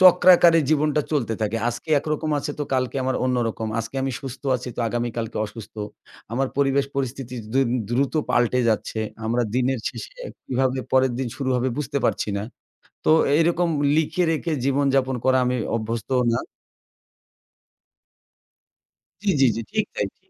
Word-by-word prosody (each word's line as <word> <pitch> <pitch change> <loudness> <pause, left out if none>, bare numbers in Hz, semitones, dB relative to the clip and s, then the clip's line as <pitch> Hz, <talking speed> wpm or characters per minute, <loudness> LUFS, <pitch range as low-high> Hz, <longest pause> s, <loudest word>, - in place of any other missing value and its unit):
চক্রাকারে 180 -2 +7
জীবনটা 150 -1 +2
চলতে 120 -7 0
থাকে। 110 +1 0
আজকে 120 +5 -6
একরকম 155 +1 -2
আছে 145 - -3
তো - - -1
কালকে 130 0 -1
আমার 130 - 0
অন্যরকম। 120 -3 0
আজকে 115 +4 -4
আমি 135 0 -1
সুস্থ 135 +1 -8
আছি 125 0 -7
তো - - -2
আগামী 120 +1 -1
কালকে 115 0 -4
অসুস্থ। 105 0 -11 0.6
আমার 135 +3 0
পরিবেশ 140 0 +2
পরিস্থিতি 130 -1 -3 0.2
দ্রু 135 - +4 0.3
দ্রুত 135 +4 +1 0.2
পাল্টে 120 +1 +2
যাচ্ছে। 110 0 -1 0.3
আমরা 120 +2 +1
দিনের 130 +1 +1
শেষে - - -9 0.3
কিভাবে 130 0 0
পরের 130 -1 +4
দিন 130 -2 -1
শুরু 135 -2 -2
হবে 125 +1 +1
বুঝতে 140 -1 -1
পারছি - - 0
না। - - -3 0.6
তো - - +5 0.3
এরকম 170 +1 +2 0.3
লিখে 160 +3 +1
রেখে 165 +1 -1
জীবনযাপন 135 -1 +2
করা 130 0 +4
আমি 125 0 +1 0.2
অভ্যস্ত 115 0 -3 0.2
না। - - +1 2.9
জি, - - 0
জি, 135 - +7
জি। - - -2
ঠিক - - +1
তাই, - - 0
ঠিক। - - -39
130 Hz, 155 wpm, -23 LUFS, 120-145 Hz, 2.9 s, চক্রাকারে